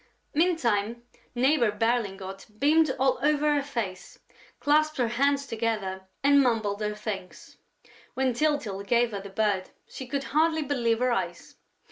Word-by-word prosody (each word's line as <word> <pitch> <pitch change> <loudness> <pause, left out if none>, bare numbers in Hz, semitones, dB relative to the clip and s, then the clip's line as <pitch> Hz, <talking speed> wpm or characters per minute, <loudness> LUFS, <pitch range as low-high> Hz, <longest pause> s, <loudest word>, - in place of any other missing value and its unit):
Meantime, 235 - +1 0.3
Neighbor 250 -2 +3
Berlingot 200 -4 -2
beamed 310 +5 +4
all 265 0 +2
over 300 0 +2
her 290 - +1
face, 230 -10 -5 0.4
clasped 310 +1 +2
her 245 -3 +1
hands 280 +4 +1
together 215 -6 -3 0.2
and 280 0 +6
mumbled 220 -5 0
her 210 0 -2
thanks. 210 -3 -7 0.6
When 260 -1 +1
Tyltyl 240 -8 0
gave 235 +3 +2
her 200 -2 -4
the 200 - -9
bird, 195 -2 0 0.2
she 260 - -8
could 275 +2 -2
hardly 315 +1 +3
believe 240 -5 0
her 250 +1 +1
eyes. 175 -6 -3
240 Hz, 140 wpm, -27 LUFS, 210-285 Hz, 0.6 s, and